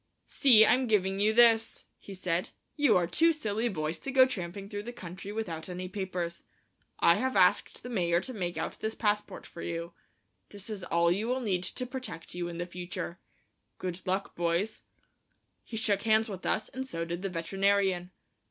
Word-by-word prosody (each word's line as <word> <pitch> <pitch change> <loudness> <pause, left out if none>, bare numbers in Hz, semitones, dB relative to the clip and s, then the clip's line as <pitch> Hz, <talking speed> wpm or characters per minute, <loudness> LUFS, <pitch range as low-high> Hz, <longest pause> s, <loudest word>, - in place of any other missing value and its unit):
"See, 230 -6 +6
I'm 255 0 +3
giving 195 -3 +1
you 210 +2 +4
this," 225 -1 +4
he 195 - -10
said; 180 +2 -1 0.3
"you 290 -9 +4
are 175 - +2
two 325 - +4
silly 225 -6 -1
boys 155 -4 -3
to - - -6
go 260 -1 +7
tramping 195 -5 -5
through 205 0 -5
the 235 +3 -7
country 190 -3 -8
without 180 -7 -4
any 180 0 -5
papers. 180 -3 -4 0.6
I 170 - +5
have 260 0 -1
asked 180 -2 +3
the - - -6
mayor 175 -7 +2
to 255 - -6
make 175 -6 -3
out 160 - -4
this 220 0 -3
passport 210 -1 -1
for 170 - -10
you. 170 0 -4 0.6
This 205 +1 -8
is 200 -3 -5
all 170 0 +2
you 205 +5 0
will 255 +2 0
need 190 -6 0
to 250 +7 -3
protect 255 -9 -7
you 175 0 -3
in 170 -1 -6
the 175 - -2
future. 175 0 -6 0.6
Good 180 -1 -4
luck, 190 +2 -1
boys." 175 +5 0 0.8
He 225 - -7
shook 205 -3 +1
hands 220 0 +3
with 190 -3 -5
us, 215 - 0
and 260 +1 -5
so 165 -9 -3
did 170 +1 -4
the 195 - -2
veterinarian. 190 +1 +1
195 Hz, 190 wpm, -30 LUFS, 175-225 Hz, 0.8 s, go